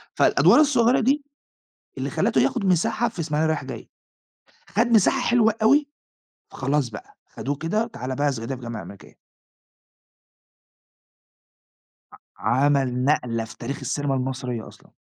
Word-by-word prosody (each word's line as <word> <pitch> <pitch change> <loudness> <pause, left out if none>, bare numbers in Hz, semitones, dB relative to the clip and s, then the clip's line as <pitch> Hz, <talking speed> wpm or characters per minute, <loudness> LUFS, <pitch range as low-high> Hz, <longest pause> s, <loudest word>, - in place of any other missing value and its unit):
فالأدوار - - +5
الصغيّرة 255 -5 +4
دي 275 +5 +1 0.7
اللي - - -3
خَلّته - - +1
ياخد 235 -6 0
مساحة 190 +6 +1
في 220 - -12
إسماعيلية 155 -1 0
رايح 155 -4 -2
جاي، 130 - -8 0.8
خَد 230 +4 +1
مساحة 235 +3 +3
حلوة 235 -3 +3
أوي، 285 +6 +4 0.6
فخلاص 135 0 -1
بقى 105 - -11
خَدوه 145 +2 -5
كده 175 +9 -1
وتعالَ 130 - -6
بقي 145 - 0
في - - 0
صعيدي 120 +1 -5
في - - -9
الجامعة 115 -3 -6
الأمريكية 95 +3 -13 3.0
أ - - -13 0.2
عمل 130 -1 +1
نقلة 120 -6 0
في 110 - -13
تاريخ 135 +4 -5
السينما 145 -2 -2
المصرية 125 -3 -4
أصلًا. - - -17
145 Hz, 135 wpm, -23 LUFS, -, 3.0 s, فالأدوار